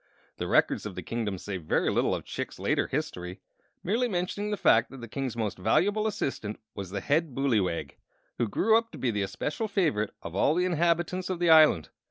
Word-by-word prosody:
The - - -3
Records - - +2
of - - -8
the - - -5
Kingdom 110 -4 -3
say 95 +1 -5
very 80 -4 0
little - - +1
of - - -7
Chick's - - -5
later - - 0
history, 90 +1 -4 0.4
merely 230 +7 +1
mentioning 200 +1 -2
the 210 - -1
fact 115 -7 +4
that 135 - -10
the 120 - -8
King's 130 0 -4
most 105 -5 -2
valuable 205 - +2
assistant 135 - -3
was 100 -3 -6
the 100 +1 -4
Head 150 - 0
Booleywag, 110 -11 0 0.5
who 120 - +2
grew 220 - +3
up 230 0 +2
to - - -8
be 125 - 0
the 105 -2 -1
especial 145 - -3
favorite 155 - 0
of 85 - -7
all 145 +10 +3
the 180 +1 +2
inhabitants 175 +1 0
of 185 - -1
the 170 -1 +3
island. 155 - +6
140 Hz, 205 wpm, -28 LUFS, -, 0.5 s, island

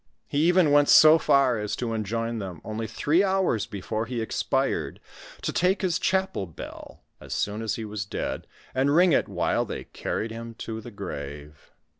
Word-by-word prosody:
He 145 - -1
even 175 -4 +4
went 145 0 +5
so 155 +1 +8
far 135 -6 +3
as 105 -1 -2
to 120 -2 -3
enjoin 115 +2 -2
them, 95 -5 -6
only 110 +1 -4
three 145 - +2
houre 190 - +1
before 110 +3 -3
he 125 -1 -3
expired, 110 - -1 0.4
to - - -2
take 190 +3 +1
his 180 -1 +1
chapel 190 - 0
bell, 80 - -10 0.2
as - - -6
soon 105 +2 -2
as 110 -1 -1
he 110 - -5
was 105 -2 -4
dead, 95 - -4 0.3
and 140 +3 +2
ring 180 +1 +5
it - - +2
while - - 0
they - - -6
carried 110 +1 -4
him 115 0 -7
to 110 0 -6
the 120 - -9
grave. 75 -7 -8
115 Hz, 180 wpm, -26 LUFS, 105-155 Hz, 0.4 s, so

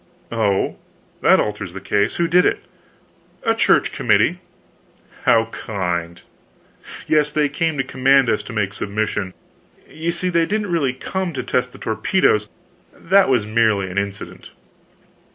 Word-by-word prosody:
"Oh, 105 -4 0 0.4
that - - +5
alters 105 -4 -3
the 95 - -6
case. 100 +1 0
Who 170 - +1
did 180 +2 +4
it?" - - 0 0.8
"A - - +2
Church - - +3
committee." - - +2 0.9
"How 115 - +4
kind!" 85 -4 -4 0.8
"Yes. 150 -1 +2
They 150 0 +1
came 160 +2 -1
to 135 - +1
command 135 0 +3
us - - +1
to - - -8
make 105 -2 -1
submission. 105 -2 -3 0.5
You 165 +2 -3
see 180 +1 -2
they 170 -2 +2
didn't 210 -2 -2
really 140 -7 +1
come 185 +6 -4
to 135 - -4
test 125 0 -1
the - - -13
torpedoes; 110 - +1 0.5
that 195 0 +3
was 120 -5 +2
merely 110 -4 +1
an 95 - 0
incident." 100 0 -6
120 Hz, 145 wpm, -20 LUFS, 100-160 Hz, 0.9 s, that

